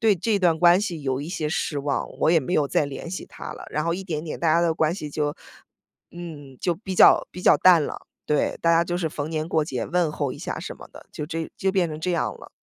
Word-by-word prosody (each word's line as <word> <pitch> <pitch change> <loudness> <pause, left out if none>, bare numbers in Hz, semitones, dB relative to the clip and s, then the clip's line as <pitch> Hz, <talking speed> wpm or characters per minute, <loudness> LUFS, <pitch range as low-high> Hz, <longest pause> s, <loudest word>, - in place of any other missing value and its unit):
对 220 -3 +4
这 205 +4 0
段 170 -3 +3
关 175 +2 +6
系 175 -7 -4
有 135 -1 -1
一 145 - -6
些 155 -3 -2
失 150 -1 -2
望， 140 -1 -2
我 - - +4
也 165 - +5
没 140 - -4
有 150 -4 +3
再 140 - +1
联 140 +4 -7
系 185 - -5
他 - - -8
了。 - - -10
然 150 - -1
后 170 0 0
一 190 - -5
点 165 -4 -4
点 155 - -6
大 165 -2 +3
家 165 - +4
的 170 -2 +2
关 160 0 +1
系 155 -5 -6
就 145 0 -2 0.7
嗯， 150 -6 -9
就 175 -2 +1
比 190 +1 -6
较 - - +6
比 180 - -9
较 - - +6
淡 175 -4 +6
了， - - -7 0.2
对， 150 - 0
大 170 - +4
家 165 0 +5
就 175 +1 -2
是 165 -3 -1
逢 150 -1 -4
年 155 -1 -2
过 160 -2 +1
节 130 -5 -3
问 175 -3 +1
候 145 -3 -2
一 - - -10
下 - - -4
什 - - -6
么 - - -13
的， - - -14
就 150 - -5
这 165 0 -4
就 190 - 0
变 190 -3 +1
成 155 0 -7
这 180 - -1
样 170 - 0
了。 - - -13
165 Hz, 295 characters per minute, -24 LUFS, 150-175 Hz, 0.7 s, 关